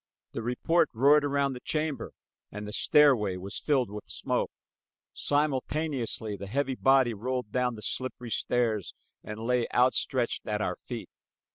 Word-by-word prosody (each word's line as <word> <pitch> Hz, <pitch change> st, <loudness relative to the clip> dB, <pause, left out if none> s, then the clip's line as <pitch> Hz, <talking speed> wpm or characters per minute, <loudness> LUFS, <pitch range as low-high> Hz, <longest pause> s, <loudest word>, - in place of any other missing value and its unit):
The -, -, -4 dB
report 125 Hz, +9 st, +1 dB
roared 140 Hz, +5 st, +5 dB
around 140 Hz, -1 st, +1 dB
the 125 Hz, -, -7 dB
chamber 155 Hz, +1 st, -2 dB, 0.4 s
and 105 Hz, 0 st, -6 dB
the 105 Hz, -, -6 dB
stairway 115 Hz, -9 st, +4 dB
was 95 Hz, +2 st, -5 dB
filled 130 Hz, -8 st, +1 dB
with 105 Hz, 0 st, -8 dB
smoke. -, -, -1 dB, 0.6 s
Simultaneously 145 Hz, -6 st, -1 dB
a 100 Hz, -, -5 dB
heavy 135 Hz, +5 st, 0 dB
body 135 Hz, -2 st, +4 dB
rolled 125 Hz, +1 st, -3 dB
down 125 Hz, -1 st, 0 dB
the 105 Hz, -, -9 dB
slippery 125 Hz, -2 st, -3 dB
stairs 110 Hz, -3 st, 0 dB, 0.3 s
and 105 Hz, +1 st, -7 dB
lay 125 Hz, -1 st, +1 dB
outstretched 125 Hz, 0 st, +1 dB
at 105 Hz, -1 st, -1 dB
our 105 Hz, -, -1 dB
feet. -, -, -8 dB
125 Hz, 145 wpm, -28 LUFS, 110-140 Hz, 0.6 s, roared